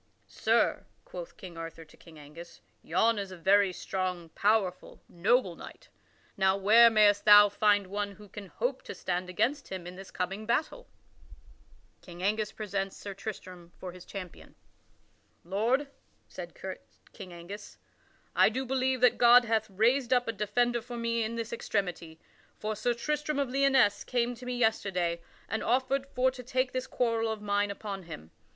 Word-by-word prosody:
"Sir." - - +1 0.2
quoth - - -9
King 175 -5 -10
Arthur 165 0 -8
to 150 - -19
King 165 -2 -16
Angus, 155 +4 -12 0.2
"yon 220 +7 +2
is 200 -1 -4
a 185 - -9
very 195 +2 +4
strong, 180 -2 -4
powerful, 200 -1 0
noble 185 +1 +1
knight; - - -12 0.5
now 190 0 +2
where 220 +4 +7
mayst 210 -2 +4
thou 205 0 +8
find 205 0 +2
one 200 +1 -3
who 210 +1 -14
can 200 +1 -9
hope - - -3
to - - -8
stand 180 0 -3
against 250 +10 0
him 185 -2 -6
in 180 +1 -9
this 195 0 -10
coming 195 +4 -4
battle?" 315 - -1
[Sidenote: - - -27
King 175 0 -10
Angus 215 +2 0
presents 195 -2 -4
Sir 200 - -7
Tristram 185 -4 -8
for 185 - -7
his 180 0 -12
champion] 185 -4 -9 0.9
"Lord," 230 - 0 0.4
said - - -9 0.6
King 190 -4 -10
Angus, 185 +4 -10 0.6
"I - - +6
do 265 +1 -3
believe 260 0 0
that 250 - +4
God 245 0 +7
hath 220 -1 0
raised 235 +6 +2
up 245 -1 +3
a - - +1
defender 235 +3 0
for 240 +1 -8
me 230 0 -1
in 225 +1 -2
this 230 0 -4
extremity. 175 -7 -3 0.4
For 215 0 -3
Sir 235 +3 0
Tristram 300 +4 -2
of 275 -3 -1
Lyonesse 270 -5 +3
came 245 -1 0
to 250 +1 -11
me 250 0 -2
yesterday, 185 -7 0 0.3
and 220 - -2
offered 265 +3 0
for 255 +1 +3
to 255 -1 -9
take 255 +1 -1
this 255 0 -3
quarrel 230 -2 0
of 220 - -4
mine 205 0 +1
upon 200 -1 -6
him. 80 - -10
210 Hz, 170 wpm, -29 LUFS, 185-245 Hz, 0.9 s, thou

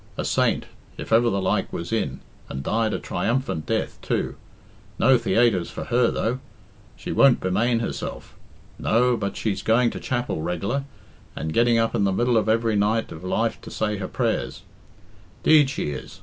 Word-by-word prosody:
A - - -2
saint, - - +1 0.3
if - - -4
ever 120 +1 +5
the 100 - 0
like 95 - 0
was 85 +5 -4
in, 115 - -2 0.3
and 65 +1 -5
died 110 +6 0
a - - -1
triumphant 120 - -2
death, - - -2
too. - - -1 0.6
No 130 +2 +5
theaytres 115 -8 +2
for - - -6
her, 120 0 +2
though. 120 +3 -1 0.6
She - - -6
won't 135 -3 +5
bemane 115 +6 +1
herself. - - -5 0.4
No, 125 +2 +3
but 100 -3 -3
she's 105 -3 -1
going 115 +2 +3
to - - -6
chapel 120 -10 -2
reg'lar, 100 - -2 0.5
and 80 +2 -4
getting 120 0 +4
up 115 0 +1
in 100 - +1
the 100 - +2
middle 120 +5 +1
of 110 -1 +1
every 115 0 +2
night 105 +2 +1
of 80 - -9
life 110 +5 -1
to - - -10
say 105 -1 -2
her 95 -1 -4
prayers. - - -2 0.8
'Deed 150 -3 +6
she 130 - -3
is. 65 -2 -8
115 Hz, 175 wpm, -24 LUFS, 95-120 Hz, 0.8 s, Deed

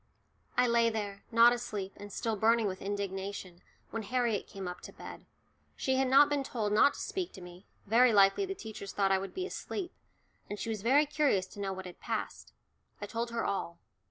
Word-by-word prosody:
I 250 - +5
lay 235 -1 +4
there, 205 -3 -4
not 235 +1 +7
asleep, 210 -5 -4
and 205 0 -10
still 225 +3 -2
burning 225 +2 +3
with 190 -2 -3
indignation, 195 -2 -4 0.3
when 225 - -3
Harriet 235 -1 0
came 195 -2 -7
up 180 - -6
to - - -9
bed. - - -10 0.5
She 265 -1 0
had 265 0 +2
not 275 +3 +7
been 290 -1 0
told 215 -6 -2
not 220 +7 +5
to - - -9
speak 370 -2 -3
to - - -10
me, 180 +2 -12 0.2
very 235 +4 +5
likely 200 - +4
the 390 - -4
teachers 215 - -8
thought 195 -1 +2
I 190 - +4
would 195 +1 -7
be 370 - -2
asleep, 375 -1 -5 0.6
and 205 - -4
she 230 - -4
was 215 -3 -3
very 275 +7 +4
curious 290 -10 +1
to - - -12
know 195 -1 -2
what 190 0 -6
had 180 - -10
passed. - - -4 0.5
I - - -4
told 235 +1 -3
her 235 0 -2
all. 180 -4 -2
220 Hz, 210 wpm, -31 LUFS, 195-245 Hz, 0.6 s, not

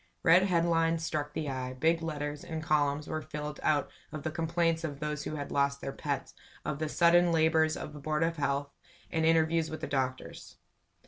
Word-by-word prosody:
Red 170 +2 +7
headlines 165 -2 +2
struck 150 -2 -2
the 155 - -3
eye, 130 -2 -3
big 160 +5 +2
letters, 150 -2 -4
and 160 -1 -5
columns 150 -2 +1
were 155 - -3
filled 150 -1 -6
out 145 -2 +1 0.2
of 155 -2 -6
the 155 - -2
complaints 165 0 0
of 145 -4 -4
those 150 -1 -3
who 155 - -3
had 145 -1 -5
lost 140 0 +1
their 135 - -4
"pets," - - -4 0.3
of 150 - -2
the 155 -1 -1
sudden 175 +1 +5
labors 160 -1 +3
of 150 - -7
the 150 - -9
board 155 +2 0
of 165 0 0
health, 140 0 -1 0.4
and 160 0 +1
interviews 165 0 +3
with 155 0 -5
doctors. 130 -2 -3
155 Hz, 190 wpm, -30 LUFS, 145-165 Hz, 0.4 s, Red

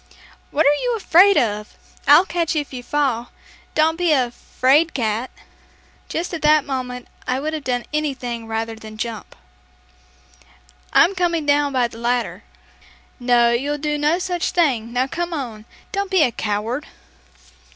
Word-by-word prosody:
"What 310 +2 +1
are 290 +1 +3
you - - 0
afraid 390 0 +5
of? 210 -2 -1 0.3
I'll 370 - +7
catch 340 -2 -1
you 305 - +2
if 285 - -11
you 250 - -5
fall. 250 -3 -1 0.5
Don't 320 +1 +3
be 345 -3 +3
a 250 -4 +1
'fraidcat!'" 255 -4 +1 0.8
Just 345 +2 -3
at 330 - -4
that 300 -1 +4
moment 250 -2 -4 0.2
I 255 +1 0
would 310 +3 -3
have 310 -2 -4
done 245 -1 -1
anything 255 -6 -3
rather 225 0 -3
than 220 -1 -11
jump. 225 -2 -6 1.6
"I'm 370 - +5
coming 345 -4 0
down 290 0 +2
by 250 -3 +2
the 230 - -12
ladder." 240 +1 -1 0.8
"No, 240 -1 +4
you'll 280 +5 -1
do 300 0 -2
no 300 +3 +2
such 360 -1 -2
thing! 255 -10 +1
Now, 250 +2 +1
come 345 +5 -4
on; 230 -7 -6 0.3
don't 400 -1 -2
be 375 -4 +4
a 250 - +2
coward!" 220 +6 -3
275 Hz, 155 wpm, -21 LUFS, 240-315 Hz, 1.6 s, I'll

